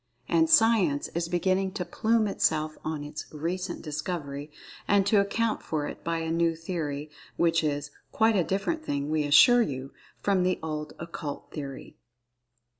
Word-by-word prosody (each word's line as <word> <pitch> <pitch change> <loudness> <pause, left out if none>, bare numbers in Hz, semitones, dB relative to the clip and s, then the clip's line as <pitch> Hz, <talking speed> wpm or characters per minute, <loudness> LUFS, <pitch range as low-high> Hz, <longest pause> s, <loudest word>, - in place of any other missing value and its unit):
And 160 -1 +3
Science 190 -9 +4
is 170 0 -3
beginning 185 +2 +1
to 180 - -3
plume 220 +2 +1
itself 155 -5 0
on 155 -2 -3
its 150 +1 -7
"recent 175 +4 -4
discovery," 150 -2 -4 0.4
and 200 -1 +4
to 200 +1 +4
account 215 +3 0
for 150 -2 -2
it - - -8
by 165 0 -1
a 160 0 -2
new 165 0 +2
theory, 155 -3 -4 0.3
which 165 -1 +3
is 145 -1 -2 0.2
"quite 220 0 +3
a 185 - +3
different 255 - -1
thing, 145 - -2
we 155 -1 +1
assure 240 - +7
you," 135 - -3 0.3
from 195 -2 +2
the 185 0 +1
old 155 -1 -4
Occult 165 -3 -7
Theory. 140 -3 -7
165 Hz, 160 wpm, -27 LUFS, 150-190 Hz, 0.4 s, assure